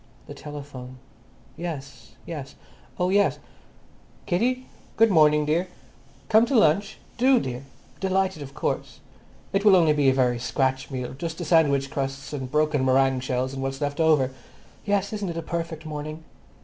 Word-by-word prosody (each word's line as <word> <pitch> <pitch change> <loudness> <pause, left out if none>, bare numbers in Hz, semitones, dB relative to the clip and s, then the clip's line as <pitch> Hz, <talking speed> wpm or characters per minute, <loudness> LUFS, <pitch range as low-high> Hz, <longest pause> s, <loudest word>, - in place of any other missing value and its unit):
The - - -9
telephone. 140 -4 -9 0.6
"Yes, 135 -9 -7
yes; 145 -5 -7 0.4
oh 180 0 +2
yes. 200 +1 +3 0.9
Kitty? 250 +8 0 0.3
Good 225 -1 +5
morning, 150 -3 +5
dear. 165 +5 +1 0.6
Come 225 +2 +5
to 270 - 0
lunch? 200 0 +3 0.2
Do, 260 0 +5
dear. 125 - -5 0.3
Delighted 190 -3 0
of 140 -1 -9
course. - - -3 0.5
It 195 0 +1
will 205 -3 +7
only 165 -4 +5
be 145 -2 +3
a - - +3
very 125 -2 +2
scratch 130 +2 -1
meal—just 135 +5 -5
the 175 - -4
sandwich 140 -4 +3
crusts 135 -1 -4
and 130 -3 -5
broken 150 -2 +2
meringue 130 0 +3
shells 130 +1 -2
and 135 - -5
what's 135 0 -3
left 145 0 -3
over. 150 -5 +3 0.5
Yes, 200 0 0
isn't 205 -3 -3
it 170 - -5
a 165 - -3
perfect 165 -1 -4
morning? 155 +1 -6
150 Hz, 155 wpm, -25 LUFS, 135-175 Hz, 0.9 s, will